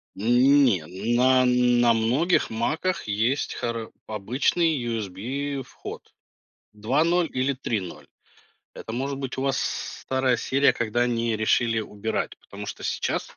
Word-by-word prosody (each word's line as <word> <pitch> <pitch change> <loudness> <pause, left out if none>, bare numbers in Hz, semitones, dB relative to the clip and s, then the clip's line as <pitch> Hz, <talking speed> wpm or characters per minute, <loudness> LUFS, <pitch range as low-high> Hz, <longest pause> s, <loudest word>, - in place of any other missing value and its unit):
Не, 120 - +4 0.3
на 130 +1 +4
на 125 -1 +4
многих 125 +11 +2
"Маках" 155 +9 -1
есть 115 +7 0
хара 115 -1 -4 0.2
обычный 130 - +1
USB-вход 120 +6 -5 0.6
2.0 155 +11 +1
или 130 +2 +1
3.0. 110 -8 -4 0.7
Это 110 - -8
может 135 +3 -3
быть 135 -1 -5
у 130 - -2
вас 135 -1 0
старая 130 -2 -1
серия, 140 +3 +3
когда 120 +1 0
они 115 -2 0
решили 115 +1 +2
убирать, 105 +1 -4
потому - - -10
что - - -7
сейчас - - -2
125 Hz, 115 wpm, -25 LUFS, 110-135 Hz, 0.7 s, Не